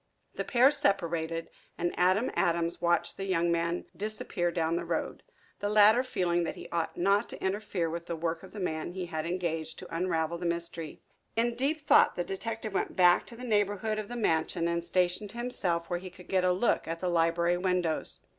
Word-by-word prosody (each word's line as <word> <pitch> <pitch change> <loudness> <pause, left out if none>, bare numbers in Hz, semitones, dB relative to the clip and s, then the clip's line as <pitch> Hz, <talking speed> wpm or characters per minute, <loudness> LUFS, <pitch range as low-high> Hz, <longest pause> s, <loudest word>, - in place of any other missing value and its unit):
The - - -3
pair 255 +2 +5
separated, 165 - 0 0.3
and 175 0 -1
Adam 185 +7 +2
Adams 170 -1 +1
watched 175 0 +1
the 195 - -3
young 170 -2 +2
man 170 +1 0
disappear 205 -4 -1
down 165 -1 0
the - - -1
road, - - -3 0.4
the 205 - -1
latter 215 +3 +6
feeling 180 -8 0
that 165 - -3
he - - -9
ought 165 -1 -2
not 200 +5 +2
to - - -8
interfere 190 -3 -1
with 170 +1 -5
the 170 - -2
work 165 0 -2
of 190 - -12
the 210 - -8
man 170 -2 -3
he 185 -1 -4
had 160 -2 -4
engaged 165 -3 -3
to - - -8
unravel 170 -1 -1
the 175 - -5
mystery. 170 -2 -4 0.3
In 235 +1 +2
deep 280 +6 0
thought - - +5
the 175 - -1
detective 220 +3 -4
went - - -1
back 180 -1 +5
to 235 - -8
the 245 - -10
neighborhood 210 -1 0
of 210 - -5
the 245 - -6
mansion 165 -5 +1
and 170 0 -1
stationed 185 +4 0
himself 190 -9 -1
where 175 -1 -2
he 185 +1 -8
could 180 0 -15
get 185 -1 +1
a 180 - +4
look 190 +7 +1
at 165 0 -3
the 185 - -2
library 170 +1 +2
windows. 180 -3 -1
175 Hz, 200 wpm, -30 LUFS, 170-205 Hz, 0.4 s, latter